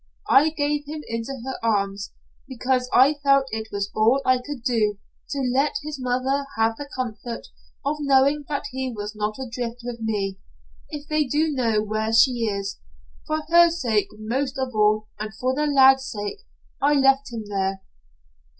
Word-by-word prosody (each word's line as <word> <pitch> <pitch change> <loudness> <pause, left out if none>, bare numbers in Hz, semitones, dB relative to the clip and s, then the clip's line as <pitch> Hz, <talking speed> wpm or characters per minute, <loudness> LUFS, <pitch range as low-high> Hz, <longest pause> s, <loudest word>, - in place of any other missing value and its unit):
I 300 +3 +6
gave 295 -1 -1
him 305 0 -6
into 230 +3 -4
her 265 - -4
arms, 200 -2 0 0.4
because 255 0 -1
I 280 +4 +5
felt 275 -1 +4
it 220 0 -4
was 200 0 -3
all 225 +5 +4
I 255 -1 +4
could 265 -1 -7
do 215 -4 +1 0.3
to 280 - -2
let 275 +3 +1
his 300 -2 -6
mother 260 +3 0
have 225 0 +2
the 285 -1 -7
comfort 235 -2 -5 0.4
of 295 +2 0
knowing 280 +1 +3
that 285 -2 -2
he 260 0 -3
was 210 -1 -6
not 210 0 -2
adrift 245 -2 -5
with 240 -1 -5
me 200 -3 -2 0.5
if 295 0 -7
they 305 -1 +1
do 305 +4 +1
know 230 -6 +1
where 215 +1 -2
she 235 0 +4
is. 200 -1 -4 0.5
For 310 0 -1
her 340 0 +7
sake 240 -11 0
most 260 +5 -2
of 260 -1 -1
all 215 0 +2
and 215 +1 -5
for 255 +3 -1
the 300 +2 0
lad's 270 -2 +5
sake 210 - -6 0.3
I 285 +2 +4
left 270 -1 +3
him 225 -2 -5
there. 195 -1 -2
255 Hz, 170 wpm, -24 LUFS, 215-280 Hz, 0.5 s, her